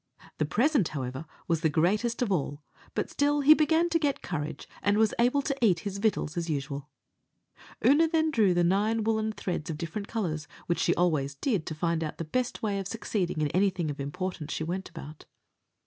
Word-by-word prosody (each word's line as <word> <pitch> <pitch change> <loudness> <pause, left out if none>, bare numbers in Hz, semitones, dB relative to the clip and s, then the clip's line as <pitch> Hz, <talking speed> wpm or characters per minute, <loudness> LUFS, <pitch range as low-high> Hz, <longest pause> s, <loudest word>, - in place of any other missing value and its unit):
The 155 - +2
present, 245 - +2
however, 130 +1 -5 0.2
was 165 -2 +1
the 160 - +3
greatest 210 +10 +1
of 220 - -1
all; 145 -4 -1 0.3
but - - -2
still 290 0 +2
he 290 +2 +9
began 320 +2 +3
to 330 0 +2
get 290 -3 -1
courage, 155 -3 -4
and 205 +1 +2
was 220 -1 +3
able 250 +4 +3
to 275 0 -1
eat 180 -7 +4
his 200 -1 -4
victuals 205 -7 0
as 170 -1 -2
usual. 140 -1 -3 1.0
Oonagh 310 +6 +5
then 320 -1 +2
drew 210 -9 +3
the 175 - +3
nine 210 +5 +2
woollen 220 0 +1
threads 180 -7 -4
of 155 - -3
different 170 +6 -5
colours, 160 -9 -3 0.2
which 170 - 0
she - - +2
always 150 -6 +1
did 200 - -1
to 155 - -4
find 165 +1 0
out 155 - -5
the - - -3
best 245 +10 -2
way 205 -2 0
of 195 - -4
succeeding 195 -6 -2
in 150 - +1
anything 185 -2 +1
of 145 - -8
importance 150 +2 -4
she - - -2
went 185 +4 -3
about. 155 -3 -10
185 Hz, 200 wpm, -28 LUFS, 155-225 Hz, 1.0 s, he